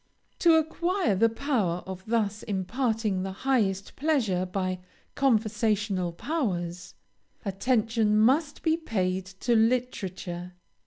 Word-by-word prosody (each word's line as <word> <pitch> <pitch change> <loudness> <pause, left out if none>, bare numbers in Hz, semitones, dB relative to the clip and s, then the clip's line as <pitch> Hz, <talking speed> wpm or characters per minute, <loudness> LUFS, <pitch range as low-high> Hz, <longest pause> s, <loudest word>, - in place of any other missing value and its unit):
To 335 -2 +6
acquire 335 - +1
the 230 +4 +4
power 225 - -1
of 190 0 -7
thus 215 -2 0
imparting 215 0 -1
the 190 +1 -3
highest 200 -8 +1
pleasure 230 - +1
by 185 0 -2 0.3
conversational 215 -6 +1
powers, 180 - -3 0.5
attention 220 +1 +1
must 280 +7 +2
be 320 -1 +3
paid 190 - -1 0.2
to 240 -1 +2
literature. 195 -7 -1
215 Hz, 105 wpm, -27 LUFS, 190-255 Hz, 0.5 s, To